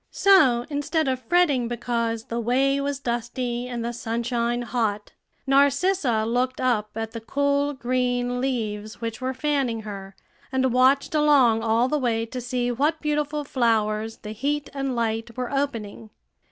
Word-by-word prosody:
So, 280 Hz, -12 st, +4 dB
instead 290 Hz, +2 st, 0 dB
of 260 Hz, -1 st, -1 dB
fretting 295 Hz, -9 st, +3 dB
because 235 Hz, -1 st, -2 dB
the 235 Hz, +1 st, -4 dB
way 270 Hz, +4 st, +2 dB
was 280 Hz, 0 st, -2 dB
dusty 240 Hz, 0 st, -3 dB
and 240 Hz, -2 st, -4 dB
the 240 Hz, -, -3 dB
sunshine 235 Hz, +1 st, -1 dB
hot, 220 Hz, -4 st, -2 dB, 0.3 s
Narcissa 275 Hz, -, +2 dB
looked 250 Hz, +3 st, 0 dB
up 230 Hz, -5 st, +1 dB
at 225 Hz, 0 st, -4 dB
the 230 Hz, -1 st, -7 dB
cool 285 Hz, +4 st, 0 dB
green 245 Hz, -1 st, -1 dB
leaves 215 Hz, -5 st, -3 dB
which 230 Hz, -1 st, -5 dB
were 260 Hz, 0 st, -2 dB
fanning 270 Hz, -6 st, 0 dB
her, 195 Hz, -2 st, -8 dB, 0.4 s
and 260 Hz, -2 st, +1 dB
watched 260 Hz, +4 st, +3 dB
along 280 Hz, -7 st, +4 dB
all 230 Hz, +2 st, +2 dB
the 300 Hz, +3 st, 0 dB
way 230 Hz, -3 st, 0 dB
to 250 Hz, +2 st, -6 dB
see 245 Hz, 0 st, -1 dB
what 295 Hz, +6 st, 0 dB
beautiful 300 Hz, 0 st, -1 dB
flowers 225 Hz, -4 st, 0 dB
the 210 Hz, -, -8 dB
heat 285 Hz, +6 st, -2 dB
and 275 Hz, -2 st, -2 dB
light 230 Hz, 0 st, -2 dB
were 250 Hz, -1 st, -3 dB
opening. 230 Hz, -6 st, -3 dB
245 Hz, 155 wpm, -24 LUFS, 230-275 Hz, 0.4 s, So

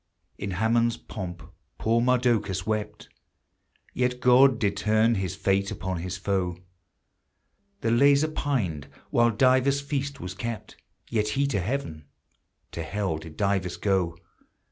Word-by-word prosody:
In 100 Hz, -, -3 dB
Haman's 115 Hz, +2 st, +2 dB
pomp 90 Hz, -8 st, -7 dB, 0.3 s
poor 115 Hz, +1 st, +2 dB
Mardocheus 120 Hz, -7 st, +1 dB
wept, 105 Hz, -1 st, -3 dB, 0.9 s
Yet 125 Hz, 0 st, 0 dB
God 125 Hz, 0 st, +6 dB
did 100 Hz, -3 st, 0 dB
turn 110 Hz, +3 st, +3 dB
his 95 Hz, -3 st, -2 dB
fate 100 Hz, 0 st, +1 dB
upon 95 Hz, -2 st, -4 dB
his 90 Hz, +2 st, -4 dB
foe; 95 Hz, -2 st, -1 dB, 1.2 s
The 115 Hz, -, +1 dB
Lazar 140 Hz, +5 st, +4 dB
pined 105 Hz, -, -2 dB, 0.2 s
while 120 Hz, 0 st, +4 dB
Dives' 130 Hz, +4 st, +3 dB
feast 140 Hz, 0 st, -3 dB
was 90 Hz, 0 st, -6 dB
kept, 110 Hz, +2 st, -6 dB, 0.3 s
Yet 105 Hz, -2 st, 0 dB
he 140 Hz, -, +3 dB
to 115 Hz, -9 st, 0 dB
heaven, 90 Hz, -, -4 dB, 0.7 s
to 85 Hz, -, -5 dB
hell 80 Hz, 0 st, -2 dB
did 80 Hz, -1 st, -11 dB
Dives 100 Hz, -3 st, 0 dB
go. 95 Hz, -5 st, 0 dB
105 Hz, 130 wpm, -26 LUFS, 95-125 Hz, 1.2 s, God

